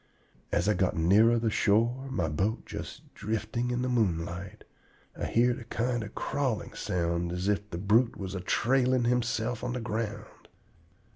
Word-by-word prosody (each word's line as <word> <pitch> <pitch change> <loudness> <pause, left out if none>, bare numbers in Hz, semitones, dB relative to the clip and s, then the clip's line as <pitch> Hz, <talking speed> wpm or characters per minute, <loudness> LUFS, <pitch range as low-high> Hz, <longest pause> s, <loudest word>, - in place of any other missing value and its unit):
As 90 - +1
I 105 - +4
got 95 -1 +1
nearer 105 +8 +5
the 115 -1 0
shore, 115 +7 +2
my 90 -11 -1
boat 95 +10 -1
just - - -8
drifting 110 +3 -2
in 125 0 -1
the - - 0
moonlight, 90 -6 -1 0.5
I - - -3
heerd 120 +1 +2
a - - -8
kind 120 +1 -1
of 105 - -9
crawling 130 -6 -2
sound 85 -2 -1
as 90 +2 -2
if 105 0 0
the 85 - -5
brute 110 +6 +3
was 95 -1 -5
a 95 - -3
trailing 130 +4 +2
himself 120 -1 0
on 125 0 -2
the 125 - -2
ground. 110 -1 -5
110 Hz, 165 wpm, -29 LUFS, 95-120 Hz, 0.5 s, nearer